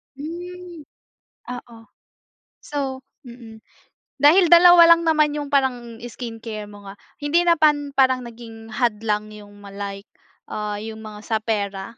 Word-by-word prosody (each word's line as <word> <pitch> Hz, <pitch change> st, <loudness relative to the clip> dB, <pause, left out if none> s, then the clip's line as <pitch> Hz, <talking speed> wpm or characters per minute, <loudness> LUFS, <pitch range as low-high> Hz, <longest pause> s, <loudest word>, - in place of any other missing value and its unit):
Hmm, 345 Hz, +1 st, -9 dB, 0.6 s
oo. 240 Hz, -2 st, -9 dB, 0.8 s
So, 270 Hz, -3 st, -4 dB, 0.2 s
mm, 235 Hz, -3 st, -13 dB, 0.5 s
dahil 320 Hz, +6 st, +5 dB
dalawa 345 Hz, 0 st, +8 dB
lang 335 Hz, -, -5 dB
naman 305 Hz, -2 st, +2 dB
yung 290 Hz, -1 st, -5 dB
parang 245 Hz, -4 st, -1 dB
skincare 225 Hz, -3 st, -7 dB
mo 205 Hz, -1 st, -13 dB
nga, 195 Hz, -, -9 dB, 0.3 s
hindi 315 Hz, +4 st, +1 dB
na 345 Hz, -, +4 dB
pan 290 Hz, -2 st, +2 dB
parang 260 Hz, -2 st, +2 dB
naging 225 Hz, -1 st, -12 dB
hadlang 215 Hz, -3 st, -1 dB
yung 205 Hz, -1 st, -14 dB
ma 200 Hz, -, -12 dB
like, 200 Hz, 0 st, -7 dB, 0.4 s
ah, 210 Hz, -1 st, -4 dB
yung 220 Hz, 0 st, -8 dB
mga 210 Hz, -1 st, -9 dB
sa 220 Hz, +1 st, -2 dB
pera? 200 Hz, -3 st, -3 dB
240 Hz, 135 wpm, -22 LUFS, 215-295 Hz, 0.8 s, dalawa